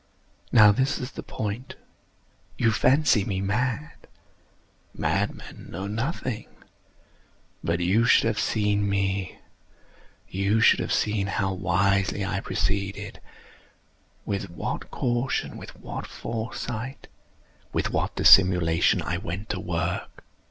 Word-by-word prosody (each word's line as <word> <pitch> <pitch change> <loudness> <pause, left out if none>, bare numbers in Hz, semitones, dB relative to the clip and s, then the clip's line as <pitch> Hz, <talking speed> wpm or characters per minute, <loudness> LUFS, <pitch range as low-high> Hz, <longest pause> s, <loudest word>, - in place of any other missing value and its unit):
Now 105 -2 +8
this 130 +7 +1
is 125 +2 -5
the - - -7
point. 110 +4 -5 0.8
You 115 - +3
fancy 130 -2 +3
me 95 -1 -2
mad. 120 +9 -2 0.9
Madmen - - -2
know 95 +3 -5
nothing. 115 +2 -3 1.2
But 85 +1 0
you 100 +7 +3
should - - +5
have 110 -2 0
seen 105 -2 +1
me. 100 -1 -1 0.9
You 100 +3 +1
should 115 - +5
have - - -3
seen 105 -2 +1
how 95 0 -1
wisely 95 +2 +1
I 95 0 -1
proceeded—with 100 +2 -2 1.3
what 85 - -5
caution—with 120 +1 -2
what - - -6
foresight—with 115 +2 -6
what - - -1
dissimulation 90 -3 +5
I 85 +1 -2
went 95 +3 -6
to 100 - -2
work! 85 -2 -3
100 Hz, 105 wpm, -26 LUFS, 95-115 Hz, 1.3 s, Now